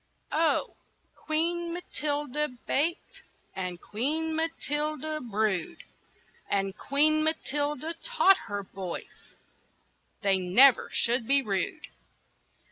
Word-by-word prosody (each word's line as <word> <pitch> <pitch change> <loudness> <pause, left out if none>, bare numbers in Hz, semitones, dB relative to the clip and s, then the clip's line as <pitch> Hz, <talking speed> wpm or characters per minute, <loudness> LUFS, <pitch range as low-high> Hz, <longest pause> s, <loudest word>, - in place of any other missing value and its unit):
OH! 320 +1 +1 0.4
Queen 335 +2 -2
Matilda 300 -4 -2 0.2
baked, 325 +5 -1 0.3
And 180 -2 -4
Queen 305 - -2
Matilda 310 -1 -2
brewed; 210 -6 -1 0.7
And 195 0 0
Queen 305 +6 +3
Matilda 295 0 -1
taught 390 -6 +4
her 205 0 -3
boys 185 -2 -8 0.9
They 195 -1 +3
never 220 +9 +5
should 235 -1 +2
be 275 +1 +4
rude. 205 +8 -2
290 Hz, 90 wpm, -28 LUFS, 210-315 Hz, 0.9 s, never